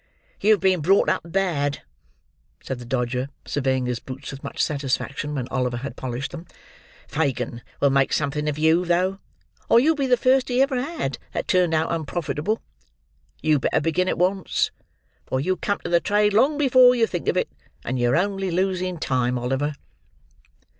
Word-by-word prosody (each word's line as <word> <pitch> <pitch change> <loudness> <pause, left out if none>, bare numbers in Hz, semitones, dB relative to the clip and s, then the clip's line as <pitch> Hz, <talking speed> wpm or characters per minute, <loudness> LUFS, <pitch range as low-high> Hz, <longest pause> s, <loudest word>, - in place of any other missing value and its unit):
"You've 215 0 +4
been 185 -3 +3
brought 195 +6 +4
up - - +1
bad," 165 -6 -1 0.8
said 130 - -5
the 120 - -9
Dodger, 125 +1 -1 0.2
surveying 130 -2 0
his 125 -2 -2
boots 130 +2 -8
with 135 0 -10
much - - -7
satisfaction 145 +1 -1
when 125 -3 -3
Oliver 125 -2 -1
had 130 0 -6
polished 130 +1 -4
them. 170 0 -9 0.6
"Fagin 125 -6 -2 0.2
will 140 - +3
make 135 0 +2
something 150 +1 0
of 150 - -3
you, 160 +3 +3
though, 180 +2 +1 0.5
or 230 - +7
you'll 310 +6 +4
be 280 -3 -1
the 250 -1 +4
first 255 +2 +3
he 250 0 +1
ever 265 -2 +2
had 260 - -3
that - - -3
turned 180 -3 +3
out 160 +1 0
unprofitable. 165 +4 -2 0.8
You'd 155 -3 +3
better - - +2
begin 165 +4 0
at - - -1
once; 185 +2 +1 0.6
for 130 - -1
you'll 185 +7 0
come 205 -1 -1
to - - -4
the 170 - +5
trade 210 +2 +2
long 270 +8 +3
before 255 -3 +6
you 235 -2 +3
think 175 -6 -5
of - - +2
it; - - +1 0.4
and 130 +1 -2
you're 120 +4 +3
only 195 +1 0
losing 185 0 -1
time, 125 -4 0
Oliver." 135 +4 -1
160 Hz, 175 wpm, -23 LUFS, 135-195 Hz, 0.8 s, or